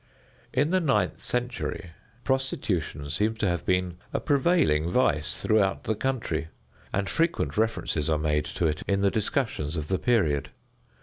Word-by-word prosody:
In 145 +5 +1
the 185 - +4
ninth 155 -6 +1
century 125 -7 -3 0.3
prostitution 95 - -1
seems 110 +7 0
to 105 - +1
have 85 -2 -1
been 90 -1 +1
a - - 0
prevailing 140 - +2
vice 75 - +1
throughout 100 -3 +2
the 110 - 0
country, 110 -10 -2 0.4
and 100 0 -1
frequent 165 +1 0
references 110 -9 0
are 80 - +3
made 75 -1 0
to 85 - -2
it 75 -1 0
in 100 -1 +1
the 100 0 +3
discussions 105 - -1
of 75 -1 -4
the 95 - +1
period. 80 - +2
100 Hz, 150 wpm, -27 LUFS, 80-125 Hz, 0.4 s, the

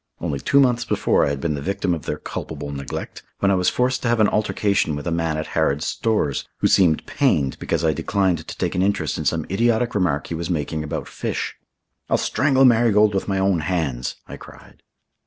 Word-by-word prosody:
Only 75 -5 -3
two 140 - +3
months 125 -3 +3
before - - +1
I - - 0
had 70 -1 -3
been 80 +1 -1
the 70 - -4
victim 100 +3 -1
of 80 - -5
their - - -2
culpable 75 -2 -6
neglect, 70 -2 -6 0.2
when 100 - +2
I - - +4
was 90 -1 +2
forced 125 +1 0
to - - -1
have 120 0 +2
an 110 - +5
altercation 100 -6 0
with 75 - -6
a 85 - -1
man 80 -2 -1
at 80 - -3
Harrod's 75 -2 +1
Stores, 105 -11 -1
who - - -2
seemed 85 -5 +3
pained 70 -2 +1
because 85 0 -1
I 80 - +3
declined 95 +2 0
to - - -7
take - - -1
an 90 - 0
interest 90 -7 0
in 80 - -4
some 80 +2 0
idiotic 115 +3 +1
remark 85 -8 0
he - - -6
was 85 +1 -4
making 80 -2 -2
about 75 - -4
fish. - - -4 0.6
"I'll - - +3
strangle 135 -1 +2
Marigold 110 -3 +4
with 95 - -1
my 95 -1 0
own 95 -2 +2
hands," 75 -6 -2
I - - -8
cried. - - -15
90 Hz, 215 wpm, -22 LUFS, 75-105 Hz, 0.6 s, an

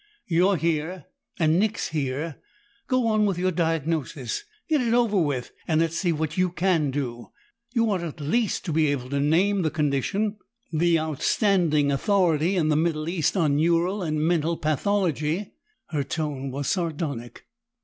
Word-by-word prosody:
"You're 180 +3 +3
here 165 +1 -1 0.3
and 160 -1 +3
Nick's 220 +2 0
here! 145 +1 -3 0.5
Go 255 -2 +1
on 215 -2 +3
with 195 -3 -1
your 185 +1 +1
diagnosis; 160 - -2 0.2
get 305 -4 +2
it 235 -1 +1
over 220 -6 +3
with, 140 -6 -2 0.2
and 160 -2 +2
let's 165 0 +1
see 175 0 +1
what 155 +1 -2
you 185 0 +3
can 170 -4 +1
do. 125 -4 -4 0.5
You 230 -1 +3
ought 190 -3 0
at 165 -3 -6
least 210 +10 0
to 165 - -2
be 155 0 +3
able 135 -3 -2
to 140 - 0
name 180 +7 +2
the 160 - +1
condition 160 +8 0 0.4
the 165 +1 +3
outstanding 155 - +2
authority 175 +1 +2
in 160 -4 +2
the 150 - +3
Middle 155 -1 0
West 170 +2 0
on 150 -5 +2
neural 170 +5 +2
and 155 -3 -1
mental 165 -1 +1
pathology!" 165 +2 0 0.4
Her 145 -3 -1
tone 140 -2 -3
was 140 +2 -4
sardonic. 150 -9 -3
165 Hz, 160 wpm, -25 LUFS, 150-185 Hz, 0.5 s, You're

